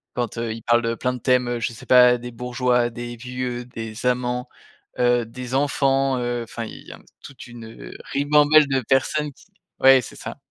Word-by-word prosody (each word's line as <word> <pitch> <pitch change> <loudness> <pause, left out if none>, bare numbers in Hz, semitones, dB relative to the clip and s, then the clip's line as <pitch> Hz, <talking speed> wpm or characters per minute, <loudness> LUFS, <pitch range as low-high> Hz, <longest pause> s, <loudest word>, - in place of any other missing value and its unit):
Quand 120 -1 -3
heu, 115 -1 -2
il 115 - -9
parle 120 0 +3
de 115 0 -2
plein 125 +2 -2
de 125 - -7
thèmes, 125 0 +2
heu, 120 -1 -2
je 115 +1 -3
sais - - -13
pas, 125 -1 +6
des 120 0 -8
bourgeois, 125 0 0
des 120 +1 -7
vieux, 125 0 -5
des 115 -1 -8
amants, 125 0 -1 0.5
heu, 120 -1 +2
des 125 +2 -7
enfants, 135 -1 +1
heu, 120 -1 -2
enfin, 115 0 -7
il - - -11
y - - -9
a - - -11 0.2
toute 140 - -11
une 115 -2 -11 0.2
ribambelle 150 +1 +4
de 135 -1 0
personnes 140 +4 0
qui - - -21 0.3
ouais, 135 0 +7
c'est - - -11
ça. - - -8
125 Hz, 200 wpm, -22 LUFS, 120-130 Hz, 0.5 s, ouais